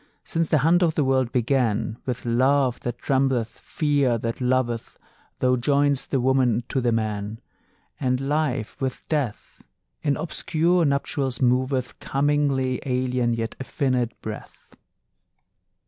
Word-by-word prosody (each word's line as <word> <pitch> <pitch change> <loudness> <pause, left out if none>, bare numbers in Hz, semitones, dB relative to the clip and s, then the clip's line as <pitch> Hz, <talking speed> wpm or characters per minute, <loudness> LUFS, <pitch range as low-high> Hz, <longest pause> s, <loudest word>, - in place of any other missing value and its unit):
Since 165 -1 -1
the 155 - +4
hunt 175 +2 +4
o' 175 - +4
the 155 -1 0
world 130 -2 +1
began, 115 -3 0
With 125 -1 -3
love 130 +2 +2
that 120 -1 -4
trembleth, 130 -4 0
fear 145 -5 +1
that 115 +2 -4
loveth, 125 -2 0 0.4
Thou 125 0 +2
join'st 140 +2 +1
the 135 - +1
woman 125 -2 +2
to 135 - 0
the 120 -1 +1
man; 110 -1 -2 0.6
And 130 -2 +1
Life 140 -3 -1
with 130 -1 -3
Death 140 -9 -3 0.4
In 145 -2 +1
obscure 170 +1 +1
nuptials 140 -2 0
moveth, 130 0 +1
Commingling 140 -2 +1
alien, 125 -2 0
yet 115 -1 -3
affinèd, 130 -3 0
breath. 110 -1 -9
130 Hz, 130 wpm, -24 LUFS, 120-140 Hz, 0.6 s, the